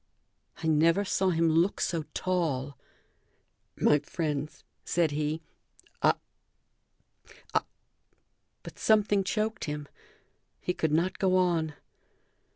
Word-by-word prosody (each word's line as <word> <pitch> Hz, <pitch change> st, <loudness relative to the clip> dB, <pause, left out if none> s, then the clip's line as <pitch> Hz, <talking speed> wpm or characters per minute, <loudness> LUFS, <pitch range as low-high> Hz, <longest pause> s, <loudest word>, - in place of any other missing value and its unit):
I -, -, -2 dB
never 165 Hz, +5 st, +4 dB
saw 190 Hz, 0 st, +1 dB
him 165 Hz, -1 st, +2 dB
look 165 Hz, +4 st, +2 dB
so 165 Hz, -3 st, -1 dB
tall. 150 Hz, -7 st, -1 dB, 1.0 s
"My 150 Hz, -, +4 dB
friends," 150 Hz, -1 st, -3 dB, 0.2 s
said 170 Hz, -3 st, +1 dB
he, 150 Hz, +2 st, -2 dB, 0.6 s
"I -, -, +5 dB, 1.4 s
I -, -, +4 dB, 0.5 s
" -, -, -48 dB
But -, -, -10 dB
something 205 Hz, -2 st, +3 dB
choked 215 Hz, +2 st, -1 dB
him. 150 Hz, -1 st, -4 dB, 0.7 s
He 180 Hz, -, -2 dB
could 160 Hz, -3 st, -1 dB
not 170 Hz, +4 st, +1 dB
go 185 Hz, -1 st, +3 dB
on. 165 Hz, -4 st, +1 dB
165 Hz, 110 wpm, -29 LUFS, 150-185 Hz, 1.4 s, I